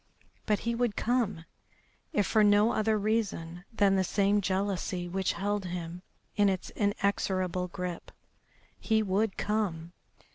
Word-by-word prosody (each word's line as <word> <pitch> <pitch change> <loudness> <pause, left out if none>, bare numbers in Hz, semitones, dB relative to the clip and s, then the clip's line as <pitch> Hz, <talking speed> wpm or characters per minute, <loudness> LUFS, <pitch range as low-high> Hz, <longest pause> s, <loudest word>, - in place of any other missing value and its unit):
But 210 -3 +1
he 235 - -1
would 235 -3 0
come, 225 -9 0 0.7
if 205 - +1
for 215 +2 +3
no 205 +2 +5
other 215 0 +1
reason 200 -5 -2
than 200 -3 +3
the 190 - +3
same 200 +2 +2
jealousy 190 -2 -1
which 190 +1 -1
held 205 0 -2
him 175 -1 -5 0.3
in 205 -1 +4
its 190 -1 -3
inexorable 190 -3 0
grip. 180 -1 -6 0.7
He 220 -1 +2
would 200 +1 0
come! 180 -6 -2
200 Hz, 135 wpm, -29 LUFS, 180-210 Hz, 0.7 s, no